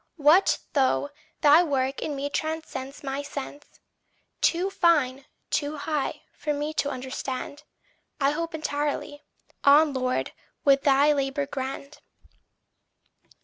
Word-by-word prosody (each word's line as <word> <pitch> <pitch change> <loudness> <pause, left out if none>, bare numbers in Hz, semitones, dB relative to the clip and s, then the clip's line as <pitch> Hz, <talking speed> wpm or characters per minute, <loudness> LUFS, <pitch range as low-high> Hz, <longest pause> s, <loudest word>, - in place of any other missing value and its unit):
What 310 +6 +5 0.2
though 285 0 +2 0.3
thy 300 +3 +7
work 270 -5 -1
in 295 - -3
me 280 +1 -2
transcends 310 -4 -4
my 275 0 -3
sense 285 0 -8 0.6
Too 360 +3 +2
fine, 280 -8 +2 0.3
too 295 0 -1
high, 300 0 -2
for 300 - -2
me 295 +2 -3
to 285 - 0
understand 260 +2 -5 0.6
I 275 0 +3
hope 330 +2 -3
entirely. 290 -1 -3 0.4
On, 290 +1 +6
Lord, 255 -1 -1 0.3
with 275 -1 +5
thy 285 +2 +4
labour 275 0 -1
grand. 275 +1 -6
285 Hz, 115 wpm, -26 LUFS, 270-305 Hz, 0.6 s, thy